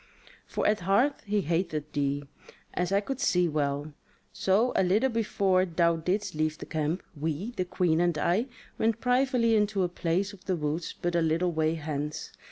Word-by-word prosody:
For -, -, -2 dB
at 210 Hz, 0 st, +3 dB
heart 200 Hz, +10 st, +2 dB
he 205 Hz, 0 st, +1 dB
hateth 165 Hz, -3 st, -1 dB
thee, 145 Hz, 0 st, -1 dB, 0.5 s
as 180 Hz, +1 st, -1 dB
I 200 Hz, +1 st, +3 dB
could 270 Hz, +5 st, -4 dB
see 180 Hz, -9 st, +3 dB
well. 145 Hz, -1 st, -1 dB, 0.4 s
So 215 Hz, +6 st, +2 dB
a -, -, +4 dB
little 210 Hz, +8 st, +2 dB
before 200 Hz, -4 st, +2 dB
thou 170 Hz, -1 st, +2 dB
didst 185 Hz, +4 st, -1 dB
leave 155 Hz, 0 st, -1 dB
the -, -, -8 dB
camp, 160 Hz, +3 st, -2 dB
we, 160 Hz, +8 st, -3 dB
the 185 Hz, -6 st, -2 dB
Queen 175 Hz, -2 st, +1 dB
and 175 Hz, -2 st, +1 dB
I, 185 Hz, -, +1 dB, 0.3 s
went 225 Hz, 0 st, +1 dB
privily 250 Hz, -2 st, +2 dB
into 210 Hz, -2 st, +2 dB
a -, -, +2 dB
place 180 Hz, +3 st, -1 dB
of 190 Hz, -, -15 dB
the 185 Hz, -, 0 dB
woods 155 Hz, +1 st, -3 dB
but 175 Hz, 0 st, -1 dB
a 170 Hz, -, +2 dB
little 165 Hz, +2 st, +1 dB
way 160 Hz, 0 st, +1 dB
hence. 150 Hz, -1 st, -4 dB
180 Hz, 180 wpm, -28 LUFS, 160-205 Hz, 0.5 s, a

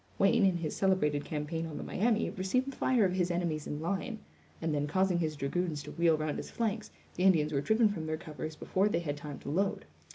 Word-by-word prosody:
Wayne, 205 Hz, +2 st, +4 dB
in 180 Hz, -2 st, +2 dB
his 160 Hz, -3 st, -3 dB
celebrated 150 Hz, -7 st, +2 dB
campaign 160 Hz, +2 st, -3 dB
on 155 Hz, -, -6 dB
the -, -, -5 dB
Miami, 225 Hz, +2 st, +1 dB
received 250 Hz, +9 st, 0 dB
the -, -, -12 dB
fire 245 Hz, -5 st, +3 dB
of 180 Hz, -, +1 dB
his 180 Hz, -1 st, +1 dB
enemies 170 Hz, -4 st, -1 dB
in 150 Hz, -, -3 dB
line; 200 Hz, +7 st, -2 dB, 0.4 s
and 160 Hz, -1 st, -1 dB
then 145 Hz, 0 st, 0 dB
causing 185 Hz, +2 st, +2 dB
his 155 Hz, -2 st, -1 dB
dragoons 150 Hz, +2 st, -2 dB
to -, -, -8 dB
wheel 165 Hz, -2 st, +3 dB
round 155 Hz, -1 st, -2 dB
his -, -, -6 dB
flanks, 220 Hz, -2 st, -2 dB, 0.2 s
the -, -, -5 dB
Indians 160 Hz, -5 st, +4 dB
were 140 Hz, -, +1 dB
driven 220 Hz, +7 st, +4 dB
from 170 Hz, -6 st, -3 dB
their 155 Hz, 0 st, -1 dB
covers 155 Hz, -1 st, -6 dB
before 190 Hz, +6 st, +1 dB
they 170 Hz, -4 st, 0 dB
had 145 Hz, -4 st, -2 dB
time 145 Hz, -1 st, -7 dB
to -, -, -6 dB
load. 195 Hz, +5 st, 0 dB
170 Hz, 230 wpm, -31 LUFS, 155-195 Hz, 0.4 s, Wayne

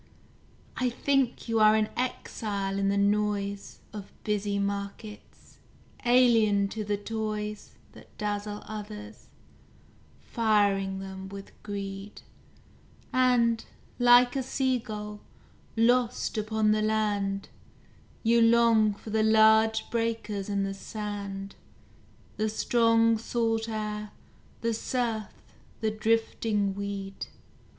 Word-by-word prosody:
I 255 Hz, -1 st, +1 dB
think 265 Hz, 0 st, 0 dB
you 225 Hz, -1 st, +1 dB
are 215 Hz, 0 st, +6 dB
an 215 Hz, -1 st, +1 dB
exile 205 Hz, -5 st, -3 dB
in 195 Hz, 0 st, +1 dB
the 200 Hz, -, +1 dB
noise 200 Hz, 0 st, 0 dB
Of 205 Hz, -2 st, -8 dB
busy 205 Hz, -1 st, -1 dB
markets; 200 Hz, +1 st, -6 dB, 0.4 s
alien 225 Hz, -5 st, +4 dB
to 215 Hz, +1 st, -4 dB
the 205 Hz, 0 st, -1 dB
toys 210 Hz, 0 st, -4 dB, 0.2 s
That -, -, -17 dB
dazzle 205 Hz, 0 st, -3 dB
others, 210 Hz, 0 st, -8 dB, 0.9 s
firing 200 Hz, -4 st, +1 dB
them 190 Hz, 0 st, -7 dB
with 200 Hz, 0 st, -9 dB
greed; 200 Hz, 0 st, -6 dB, 0.9 s
And, 240 Hz, -3 st, +3 dB, 0.4 s
like 245 Hz, +1 st, +6 dB
a 270 Hz, -, +1 dB
seagull, 235 Hz, -6 st, -2 dB, 0.6 s
lost 245 Hz, +2 st, +2 dB
upon 215 Hz, 0 st, +1 dB
the 215 Hz, 0 st, +2 dB
land, 205 Hz, -2 st, 0 dB, 0.7 s
You 235 Hz, +1 st, +4 dB
long 230 Hz, -2 st, +4 dB
for 215 Hz, -, -10 dB
the 220 Hz, 0 st, +2 dB
large 220 Hz, 0 st, +4 dB
breakers 225 Hz, -3 st, -2 dB
and 200 Hz, -1 st, 0 dB
the 195 Hz, -, -3 dB
sand, 200 Hz, -1 st, -6 dB, 0.8 s
The 215 Hz, +1 st, 0 dB
strong 230 Hz, 0 st, +3 dB
salt 225 Hz, -1 st, -1 dB
air, 210 Hz, -1 st, -4 dB, 0.5 s
the 230 Hz, 0 st, 0 dB
surf, 225 Hz, -2 st, -2 dB, 0.5 s
the 220 Hz, -1 st, 0 dB
drifting 215 Hz, -2 st, 0 dB
weed. 200 Hz, -1 st, -5 dB
215 Hz, 105 wpm, -28 LUFS, 200-230 Hz, 0.9 s, are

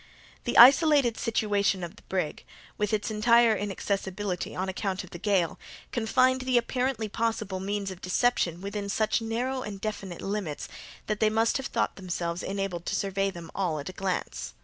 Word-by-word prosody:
The 240 Hz, -, 0 dB
isolated 275 Hz, -1 st, +7 dB
situation 200 Hz, -4 st, +1 dB
of 170 Hz, -, -6 dB
the -, -, -17 dB
brig, 180 Hz, -5 st, -2 dB, 0.3 s
with 210 Hz, -1 st, -1 dB
its 215 Hz, 0 st, -1 dB
entire 230 Hz, +1 st, +5 dB
inaccessibility 195 Hz, -2 st, -3 dB
on 185 Hz, +1 st, -2 dB
account 190 Hz, 0 st, -2 dB
of 185 Hz, -, -13 dB
the 175 Hz, -, -8 dB
gale, 190 Hz, -4 st, +1 dB, 0.3 s
confined 255 Hz, +3 st, +2 dB
the 255 Hz, -1 st, +2 dB
apparently 250 Hz, -1 st, 0 dB
possible 215 Hz, -3 st, -2 dB
means 200 Hz, 0 st, -2 dB
of 185 Hz, 0 st, -10 dB
deception 180 Hz, -3 st, +1 dB
within 200 Hz, 0 st, -4 dB
such 215 Hz, +2 st, +1 dB
narrow 245 Hz, +4 st, -2 dB
and 205 Hz, -4 st, -6 dB
definite 195 Hz, -4 st, -5 dB
limits, 195 Hz, -7 st, -3 dB, 0.4 s
that 215 Hz, -1 st, -2 dB
they 215 Hz, -, +4 dB
must 225 Hz, +3 st, +2 dB
have 270 Hz, -, -4 dB
thought -, -, -1 dB
themselves 175 Hz, -2 st, -3 dB
enabled 195 Hz, -3 st, -3 dB
to -, -, 0 dB
survey 195 Hz, 0 st, 0 dB
them 170 Hz, -3 st, -9 dB
all 180 Hz, -5 st, -1 dB
at 145 Hz, +4 st, -5 dB
a -, -, -8 dB
glance. 190 Hz, -1 st, -3 dB
205 Hz, 170 wpm, -28 LUFS, 185-225 Hz, 0.4 s, isolated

